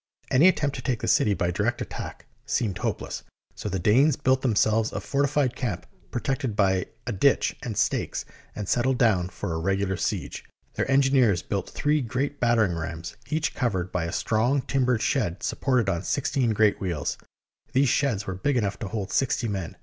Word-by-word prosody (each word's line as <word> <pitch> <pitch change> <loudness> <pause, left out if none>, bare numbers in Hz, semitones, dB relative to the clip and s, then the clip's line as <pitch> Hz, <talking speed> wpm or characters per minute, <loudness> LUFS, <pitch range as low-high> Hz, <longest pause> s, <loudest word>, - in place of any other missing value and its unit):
Any 140 +8 +6
attempt 145 -6 +2
to - - -5
take 125 -4 -1
the - - -2
city 105 -2 +3
by 85 -1 0
direct 105 +6 0
attack - - -6 0.2
seemed 105 -6 -1
hopeless, - - -3 0.3
so 105 - -5
the 95 - -1
Danes 125 - +4
built 130 0 +2
themselves 110 -2 +2
a - - -3
fortified 140 -2 0
camp 115 -10 -3 0.2
protected 125 -1 -2
by 95 -2 +2 0.2
a 125 - -2
ditch 125 +7 +2
and 110 -4 -5
stakes, 110 - 0 0.3
and 105 -2 -4
settled 125 +3 +2
down 95 -7 +2
for 85 -1 -4
a 80 - -2
regular 95 +2 0
siege. - - -3 0.3
Their - - -2
engineers 130 -8 +4
built 100 - -3
three 150 0 +1
great 135 +4 -2
battering 115 -6 +3
rams, 85 0 -5
each 155 0 0
covered 95 -8 -1
by 90 -2 -1
a 85 - -3
strong 120 +7 +1
timbered 125 -4 +1
shed 105 -11 0
supported 125 -6 +1
on 85 -3 0
sixteen 130 +2 0
great 110 -1 +2
wheels. 85 -7 -2 0.5
These 135 0 +4
sheds 115 -7 +1
were 95 - -3
big 130 +9 0
enough 105 -4 -1
to 110 - -4
hold 100 -1 -4
sixty 130 -3 +1
men. 95 -5 -4
110 Hz, 180 wpm, -26 LUFS, 95-130 Hz, 0.5 s, Any